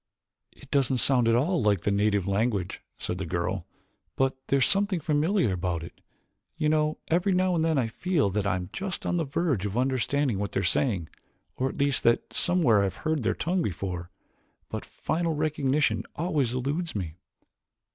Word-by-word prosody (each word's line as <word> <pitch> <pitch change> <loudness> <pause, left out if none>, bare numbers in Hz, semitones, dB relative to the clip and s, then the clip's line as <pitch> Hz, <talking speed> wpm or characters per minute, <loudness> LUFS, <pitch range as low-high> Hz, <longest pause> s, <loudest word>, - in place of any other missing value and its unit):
"It 140 - -16
doesn't 135 -2 +2
sound 125 -1 +3
at 115 - +4
all 160 +8 +2
like 105 -4 +2
the 100 - 0
native 100 -1 +1
language," 100 -2 0 0.2
said 90 - -4
the 95 - -2
girl, 85 +2 -2 0.5
"but 135 0 +1
there 140 - +3
is 135 - +4
something 195 -2 +2
familiar 155 - +1
about 85 -2 -2
it. 85 - -11 0.6
You 155 -2 +1
know, 155 0 +1
every 180 +4 +2
now 185 0 +2
and 165 -2 +1
then 160 -2 +2
I 130 - +2
feel 145 - 0
that 100 0 0
I 100 - +2
am 90 +1 -5
just 195 -1 -4
on 175 - 0
the 165 - 0
verge 140 - 0
of 100 +3 -4
understanding 130 -2 +1
what 100 -1 -3
they - - +1
are - - -3
saying, 90 - +1 0.5
or 130 +1 0
at - - -8
least 140 -2 +2
that 115 0 +2
somewhere 165 - +3
I - - +2
have 95 -2 -3
heard 155 -2 +1
their 110 - 0
tongue 180 +3 0
before, 90 - -3 0.6
but - - -5
final 165 -1 -2
recognition 145 -7 +1
always 155 -7 0
eludes 145 +6 -2
me." 90 -5 -4
130 Hz, 190 wpm, -27 LUFS, 100-160 Hz, 0.6 s, at